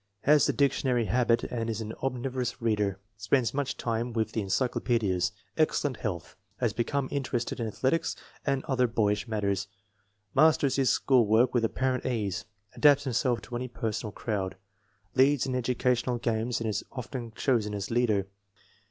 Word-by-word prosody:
Has 150 +1 +5
the - - +3
dictionary 130 -4 +2
habit, 115 +3 +2
and 115 -2 -3
is 110 -1 -2
an 110 0 -5
omnivorous 130 -1 -2
reader. 105 -4 0 0.2
Spends 115 +4 +1
much 135 -1 -2
time 115 +1 -2
with 110 -1 0
encyclo 110 +4 0
pedias. 95 -7 +1 0.3
Excellent 145 -3 +1
health. 90 -6 -4 0.2
Has 120 -3 0
become 130 +3 -1
interested 130 -4 -2
in 115 - -1
athletics 135 +9 0 0.3
and 135 -2 0
other 125 -4 +2
boyish 105 -1 0
matters. 100 -3 -1 0.7
Masters 150 -2 +4
his 135 -2 +3
school 125 -5 +3
work 115 +4 +4
with 120 -2 +2
apparent 130 +3 0
ease. 105 -4 -2 0.3
Adapts 145 -1 +5
himself 125 -2 0
to 120 - -7
any 125 +1 -3
person 115 -2 -3
or - - -6
crowd. 100 -4 -3 0.6
Leads 135 +1 +4
in 130 - -2
educational 125 0 0
games 115 +1 -1
and 115 - -2
is 105 - -1
often 125 -2 -6
chosen 110 -6 +1
as 100 +1 -4
leader. 110 -5 +2
120 Hz, 160 wpm, -28 LUFS, 110-130 Hz, 0.7 s, Has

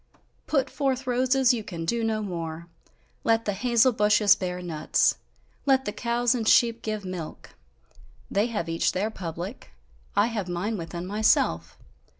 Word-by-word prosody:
Put 275 -3 +1
forth 270 -2 -1
roses, 255 +1 +3
you 230 -3 -3
can 170 -5 -6
do 235 +6 0
no 220 -1 0
more! 170 -3 -5 0.6
Let 225 0 +2
the 205 - 0
hazel 240 +4 +3
bushes 210 -2 +4
bear 180 -1 -4
nuts! 160 -4 +1 0.5
Let 265 -1 +3
the 205 - -2
cows 235 +2 0
and 230 -3 -2
sheep 230 0 +4
give 215 -2 -4
milk; 180 -4 -7 0.8
they 205 +3 +2
have 205 -8 -3
each 165 0 0
their 205 +4 -1
public, 170 - -7 0.5
I 205 - +4
have 215 -6 -3
mine 185 +6 -2
within 170 -1 -6
myself! 185 - +1
210 Hz, 150 wpm, -26 LUFS, 175-235 Hz, 0.8 s, bushes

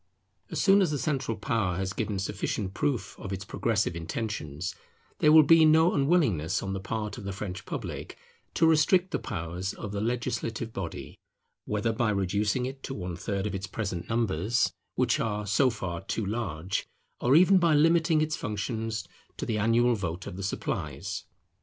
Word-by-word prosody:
As - - -3
soon 200 0 +5
as 185 - +3
the 150 - -1
central 135 -6 -1
power 100 -4 0
has 95 0 -2
given 105 -2 -2
sufficient 95 0 -2
proof 125 -6 -1
of 100 - -6
its 95 0 -4
progressive 105 -4 0
intentions, 85 -2 -4 0.5
there 150 - +5
will 155 0 +9
be 165 +2 +7
no 160 +2 +5
unwillingness 135 - +2
on 95 0 -3
the 95 - -3
part 105 +1 -4
of - - -9
the 100 - -3
French 95 -2 -6
public - - -5 0.4
to 165 - +4
restrict 165 +4 +4
the - - 0
powers 90 0 -4
of 100 - -6
the 100 0 -2
legislative 115 -1 -2
body, 85 -4 -6 0.5
whether 105 +2 0
by 110 0 +1
reducing 105 +4 0
it 135 +1 -6
to 135 - -5
one 90 -3 -4
third 100 +2 -3
of 105 - -2
its 95 0 -4
present 95 -4 -4
numbers, 115 -1 +1 0.2
which - - +2
are 105 -1 -1
so 105 +7 +3
far 90 -7 -4
too 105 +3 -3
large, 95 -5 -2 0.3
or 125 +3 +3
even 185 +3 +7
by 170 -3 +4
limiting 165 +1 +4
its 155 0 0
functions 110 0 -3 0.3
to - - -3
the 110 -2 -1
annual 115 +3 +3
vote 90 -4 -3
of - - -6
the 95 - -6
supplies. 100 - -3
105 Hz, 180 wpm, -28 LUFS, 95-130 Hz, 0.5 s, will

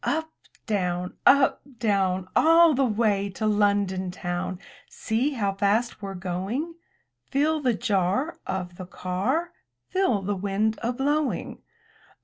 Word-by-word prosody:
Up, 320 +1 -1 0.3
down! 180 -4 -1
Up, 275 0 +5 0.2
down! 190 -5 +1
All 330 0 +6
the 270 0 +2
way 210 -4 +1
to 220 - -2
London 200 -3 +1
town 175 0 -3 0.2
— 285 - -26
See 240 +7 -1
how 200 -6 -1
fast 210 +4 0
we're 195 -1 -5
going! 190 - -3 0.6
Feel 305 +3 +1
the 250 -5 +2
jar 205 - 0
Of 180 -2 -4
the 185 - -7
car? 210 - -2 0.4
Feel 370 - +1
the 205 +2 -1
wind 205 +3 -1
a 235 - 0
blowing? 285 +3 -1
210 Hz, 130 wpm, -25 LUFS, 190-270 Hz, 0.6 s, All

